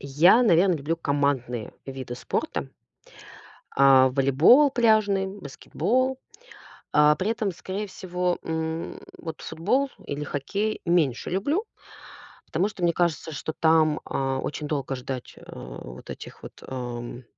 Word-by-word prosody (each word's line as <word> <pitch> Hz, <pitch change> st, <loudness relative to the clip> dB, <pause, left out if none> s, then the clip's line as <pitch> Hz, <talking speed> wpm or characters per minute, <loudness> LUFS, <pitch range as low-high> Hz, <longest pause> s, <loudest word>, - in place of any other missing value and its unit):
Я, 165 Hz, -, +5 dB
наверно, 180 Hz, -3 st, +4 dB
люблю 155 Hz, +3 st, -2 dB
командные 140 Hz, -6 st, -1 dB
виды 130 Hz, -2 st, -6 dB
спорта -, -, -3 dB, 1.0 s
а, 135 Hz, -1 st, +6 dB
волейбол 145 Hz, -, +5 dB
пляжный, 215 Hz, -5 st, +3 dB
баскетбол. 225 Hz, -, -2 dB, 0.7 s
А, 150 Hz, +1 st, +6 dB
при 195 Hz, +7 st, -1 dB
этом, 220 Hz, -4 st, -1 dB
скорее 190 Hz, +4 st, -5 dB
всего, 180 Hz, -1 st, -2 dB
м, 160 Hz, 0 st, -3 dB, 0.2 s
вот 160 Hz, -2 st, -7 dB
футбол 260 Hz, +12 st, 0 dB, 0.2 s
или 145 Hz, +1 st, -4 dB
хоккей 200 Hz, +11 st, -2 dB
меньше 160 Hz, -8 st, +1 dB
люблю, 285 Hz, -, 0 dB, 0.8 s
потому 180 Hz, +6 st, 0 dB
что 205 Hz, -4 st, -10 dB
мне 170 Hz, -1 st, +3 dB
кажется, 165 Hz, -2 st, -1 dB
что 155 Hz, +2 st, -4 dB
там, 160 Hz, -1 st, +3 dB
а, 135 Hz, -1 st, -1 dB
очень 150 Hz, +2 st, -4 dB
долго 140 Hz, -3 st, -2 dB
ждать, 125 Hz, 0 st, -6 dB
э, -, -, -15 dB
вот -, -, -10 dB
этих -, -, -9 dB
вот, -, -, -12 dB
ам, 120 Hz, -1 st, -6 dB
160 Hz, 130 wpm, -25 LUFS, 135-195 Hz, 1.0 s, а